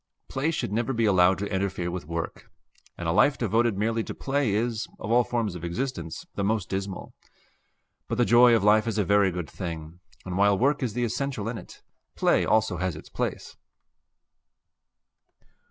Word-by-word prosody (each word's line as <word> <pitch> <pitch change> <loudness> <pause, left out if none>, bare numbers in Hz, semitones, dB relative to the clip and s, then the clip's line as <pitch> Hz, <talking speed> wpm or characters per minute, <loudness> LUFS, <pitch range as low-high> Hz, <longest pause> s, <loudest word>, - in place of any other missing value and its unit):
Play 135 +4 -1
should 160 - -2
never 115 +4 0
be 115 -2 +1
allowed 95 -2 +4
to 100 0 -4
interfere 95 -2 -1
with 90 -3 -6
work; 85 0 -5 0.5
and 85 - -4
a - - +2
life 115 - +4
devoted 115 -1 +1
merely 115 +2 0
to - - -6
play 140 -4 0
is, 115 0 -1
of 110 - -5
all 120 +1 +5
forms 115 -5 -2
of 90 -2 -8
existence, 85 - -4
the 100 - -2
most 105 -1 0
dismal. 95 0 -4 0.9
But 115 - -2
the 120 - +3
joy 120 0 +6
of 110 - +1
life 105 +2 +4
is 110 - -1
a 105 - +3
very 100 +1 +4
good 90 -3 -4
thing, 85 -2 -7 0.3
and 90 0 -3
while 100 -1 +4
work 140 +6 +2
is 120 -5 -1
the 120 +1 -1
essential 120 -2 -2
in 115 -1 -3
it, - - -14 0.3
play - - +3
also 110 -4 +2
has 90 -2 -2
its 75 - -11
place. - - -4
105 Hz, 185 wpm, -26 LUFS, 95-120 Hz, 0.9 s, joy